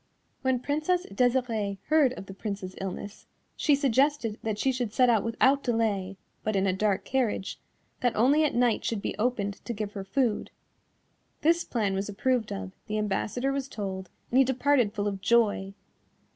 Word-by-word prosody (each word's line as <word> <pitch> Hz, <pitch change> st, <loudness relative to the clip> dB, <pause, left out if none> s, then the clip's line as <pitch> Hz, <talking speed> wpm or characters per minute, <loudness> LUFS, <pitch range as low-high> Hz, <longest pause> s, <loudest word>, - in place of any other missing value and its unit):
When 260 Hz, -2 st, +1 dB
Princess 310 Hz, +6 st, 0 dB
Desirée 230 Hz, -3 st, +1 dB
heard 300 Hz, -5 st, +4 dB
of 195 Hz, -, -8 dB
the 195 Hz, -, -9 dB
Prince's 195 Hz, -2 st, -5 dB
illness, 195 Hz, +2 st, -6 dB, 0.3 s
she 290 Hz, -, +3 dB
suggested 275 Hz, -4 st, +1 dB
that 220 Hz, -2 st, -2 dB
she 265 Hz, +5 st, +2 dB
should 245 Hz, -4 st, -2 dB
set 250 Hz, +2 st, +4 dB
out 220 Hz, -4 st, +2 dB
without 260 Hz, +4 st, +3 dB
delay, 210 Hz, -6 st, 0 dB, 0.3 s
but 215 Hz, -1 st, -1 dB
in 195 Hz, 0 st, +2 dB
a 190 Hz, -, +2 dB
dark 200 Hz, 0 st, 0 dB
carriage, 240 Hz, -7 st, -1 dB, 0.4 s
that 245 Hz, -2 st, +1 dB
only 275 Hz, +7 st, +4 dB
at 300 Hz, -, +1 dB
night 240 Hz, -2 st, +2 dB
should 220 Hz, -3 st, -2 dB
be -, -, -2 dB
opened 210 Hz, -4 st, -1 dB
to 240 Hz, -, -4 dB
give 210 Hz, -1 st, -4 dB
her 195 Hz, -, -5 dB
food. 220 Hz, +3 st, 0 dB, 0.9 s
This 335 Hz, +2 st, +3 dB
plan 210 Hz, -5 st, -1 dB
was 195 Hz, +2 st, -2 dB
approved 230 Hz, +3 st, 0 dB
of; 95 Hz, -1 st, -5 dB, 0.2 s
the 215 Hz, -, -2 dB
ambassador 215 Hz, +5 st, -1 dB
was 275 Hz, -1 st, -2 dB
told, 190 Hz, -6 st, -5 dB, 0.2 s
and 255 Hz, -, +4 dB
he -, -, +8 dB
departed 265 Hz, -3 st, +2 dB
full 205 Hz, -1 st, -1 dB
of 195 Hz, -2 st, -3 dB
joy. 205 Hz, -4 st, +2 dB
225 Hz, 175 wpm, -28 LUFS, 200-260 Hz, 0.9 s, he